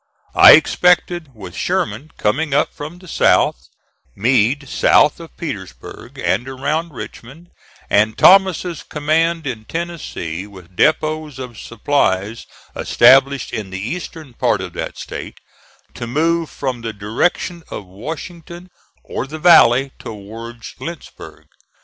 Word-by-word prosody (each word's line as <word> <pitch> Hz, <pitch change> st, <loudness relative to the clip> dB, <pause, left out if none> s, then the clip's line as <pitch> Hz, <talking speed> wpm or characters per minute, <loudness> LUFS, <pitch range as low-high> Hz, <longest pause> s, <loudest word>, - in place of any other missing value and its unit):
I -, -, +10 dB
expected, 175 Hz, +1 st, +3 dB
with 105 Hz, -, -10 dB
Sherman 110 Hz, +9 st, -2 dB
coming 145 Hz, +7 st, 0 dB
up -, -, +1 dB
from 155 Hz, +4 st, -8 dB
the 185 Hz, +1 st, -15 dB
South, 65 Hz, -, +2 dB, 0.5 s
Meade 125 Hz, +5 st, +1 dB
south 150 Hz, +4 st, +3 dB
of 165 Hz, -1 st, -12 dB
Petersburg 115 Hz, -, -8 dB
and 125 Hz, +2 st, -1 dB
around 150 Hz, +5 st, -2 dB
Richmond, 140 Hz, +9 st, -10 dB, 0.4 s
and 110 Hz, +1 st, +2 dB
Thomas's 185 Hz, -3 st, +4 dB
command 160 Hz, +2 st, 0 dB
in 115 Hz, -5 st, -5 dB
Tennessee 150 Hz, -, -5 dB
with 95 Hz, -3 st, -15 dB
depots 155 Hz, -, +1 dB
of 125 Hz, -4 st, -8 dB
supplies 115 Hz, -3 st, -1 dB, 0.3 s
established 135 Hz, +1 st, +4 dB
in 105 Hz, -4 st, -4 dB
the 95 Hz, -, -6 dB
eastern 155 Hz, -, -6 dB
part 120 Hz, -3 st, +1 dB
of 90 Hz, -2 st, -6 dB
that -, -, -5 dB
State, -, -, -8 dB, 0.6 s
to 120 Hz, -, -6 dB
move 165 Hz, +5 st, 0 dB
from 130 Hz, -4 st, -4 dB
the 115 Hz, -1 st, -5 dB
direction 115 Hz, -, -1 dB
of 105 Hz, -, -7 dB
Washington 165 Hz, -, -9 dB, 0.3 s
or -, -, -5 dB
the 155 Hz, +3 st, -7 dB
valley 135 Hz, -6 st, +5 dB
towards 115 Hz, +2 st, -9 dB
Lynchburg. 170 Hz, -2 st, -9 dB
135 Hz, 125 wpm, -18 LUFS, 110-165 Hz, 0.6 s, I